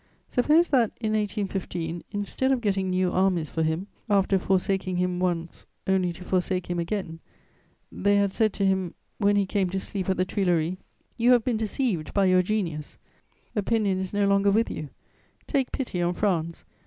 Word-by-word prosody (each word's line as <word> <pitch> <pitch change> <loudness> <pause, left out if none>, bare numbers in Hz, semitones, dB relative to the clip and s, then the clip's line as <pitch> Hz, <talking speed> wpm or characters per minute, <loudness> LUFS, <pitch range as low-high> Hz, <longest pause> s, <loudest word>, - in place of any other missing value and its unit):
Suppose 305 +7 +3
that, 245 -6 +4
in 215 -2 -1
1815, 195 -5 -2
instead 205 +6 -1
of 265 - +2
getting 195 -4 0
new 185 0 +1
armies 180 -5 +1
for 160 - -1
him, 160 +4 0 0.2
after 195 -1 +3
forsaking 190 0 0
him 180 0 0
once 170 -2 -2 0.2
only 190 -2 +2
to 180 - -11
forsake 180 -1 -1
him 175 - -1
again, 170 -2 -3 0.7
they 205 0 +2
had 200 -1 +2
said 220 -2 +2
to 200 - 0
him, 190 -2 0 0.2
when 205 -1 +3
he 200 -1 +3
came 190 -1 0
to 190 +2 -2
sleep 190 -1 -4
at 190 - +1
the 185 - +2
Tuileries: 180 -3 0 0.4
"You 245 +1 +5
have 240 -2 +4
been 240 -2 0
deceived 215 - -2
by 200 -1 +4
your 185 -1 +5
genius, 175 -7 -3 0.6
opinion 205 -2 +1
is 190 -1 -4
no 205 0 +1
longer 200 0 +3
with 220 +3 +2
you; 150 - -5 0.6
take 270 -4 0
pity 235 -10 -3
on 175 +1 0
France. 170 -5 -1
190 Hz, 180 wpm, -26 LUFS, 180-210 Hz, 0.7 s, You